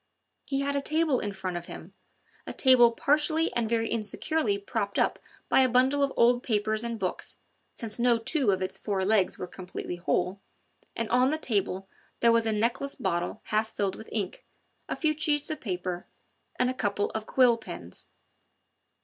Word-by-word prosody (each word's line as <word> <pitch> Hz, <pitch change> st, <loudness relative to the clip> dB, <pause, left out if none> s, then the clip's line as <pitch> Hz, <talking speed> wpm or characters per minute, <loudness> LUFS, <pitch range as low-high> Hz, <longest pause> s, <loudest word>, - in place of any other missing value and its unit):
He 275 Hz, 0 st, 0 dB
had 280 Hz, 0 st, -1 dB
a 280 Hz, -, +1 dB
table 310 Hz, -2 st, +1 dB
in 205 Hz, -, -3 dB
front 185 Hz, -2 st, -4 dB
of 175 Hz, -, -6 dB
him -, -, -9 dB, 0.5 s
a -, -, -4 dB
table 250 Hz, -3 st, +6 dB
partially 305 Hz, +6 st, +1 dB
and 235 Hz, -2 st, 0 dB
very 225 Hz, -1 st, +1 dB
insecurely 230 Hz, +2 st, -1 dB
propped 200 Hz, 0 st, -3 dB
up -, -, +2 dB, 0.3 s
by -, -, +4 dB
a 260 Hz, -1 st, +5 dB
bundle 260 Hz, +4 st, +3 dB
of 280 Hz, -1 st, +2 dB
old 245 Hz, +1 st, +5 dB
papers 215 Hz, -1 st, 0 dB
and 235 Hz, -1 st, -3 dB
books, 185 Hz, -4 st, -4 dB, 0.4 s
since 225 Hz, 0 st, -4 dB
no 240 Hz, -1 st, +4 dB
two 255 Hz, +2 st, 0 dB
of 190 Hz, -1 st, +2 dB
its 185 Hz, -, -4 dB
four 195 Hz, -3 st, -1 dB
legs 200 Hz, -2 st, +2 dB
were -, -, -4 dB
completely 180 Hz, -1 st, -7 dB
whole 180 Hz, +2 st, 0 dB, 0.6 s
and 230 Hz, -, -2 dB
on 250 Hz, +2 st, +4 dB
the 310 Hz, -, 0 dB
table 195 Hz, -8 st, -1 dB, 0.3 s
there 235 Hz, -, +5 dB
was 230 Hz, -1 st, +3 dB
a -, -, +2 dB
neckless 235 Hz, +6 st, 0 dB
bottle 175 Hz, -2 st, -2 dB
half 220 Hz, +1 st, +2 dB
filled 200 Hz, -3 st, -2 dB
with 220 Hz, -, -11 dB
ink, 200 Hz, -5 st, -3 dB, 0.5 s
a -, -, -1 dB
few 310 Hz, -2 st, +1 dB
sheets 295 Hz, -1 st, 0 dB
of 310 Hz, -, -5 dB
paper 180 Hz, -3 st, -4 dB, 0.5 s
and 250 Hz, -, +2 dB
a -, -, -4 dB
couple 205 Hz, -4 st, -1 dB
of 220 Hz, 0 st, -5 dB
quill 250 Hz, -3 st, +5 dB
pens. 230 Hz, -, -10 dB
230 Hz, 185 wpm, -28 LUFS, 200-260 Hz, 0.6 s, table